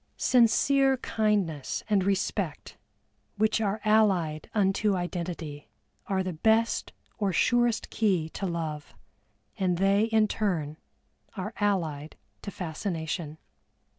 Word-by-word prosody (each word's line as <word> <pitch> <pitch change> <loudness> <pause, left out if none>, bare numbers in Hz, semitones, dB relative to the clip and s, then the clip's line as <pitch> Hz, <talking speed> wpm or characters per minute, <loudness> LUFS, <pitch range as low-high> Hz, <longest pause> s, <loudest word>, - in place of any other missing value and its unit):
Sincere 265 +3 +4
kindness 205 - -1
and 205 -3 +2
respect, 195 0 -2 0.6
which 220 +1 +2
are 210 0 0
allied 190 -8 +2
unto 200 0 +2
identity, 170 -4 -5 0.4
are 190 -1 0
the 185 -1 -3
best 220 +7 +1 0.3
or 200 -2 +1
surest 240 +5 +1
key 190 -8 +1
to 195 - -4
love, 160 -4 -4 0.6
and 180 -2 +1
they 195 +3 +3
in 220 -1 +3
turn 170 -9 -2 0.6
are 205 +4 -4
allied 160 -8 -1 0.3
to - - -6
fascination. 160 -3 -4
195 Hz, 105 wpm, -28 LUFS, 165-215 Hz, 0.6 s, Sincere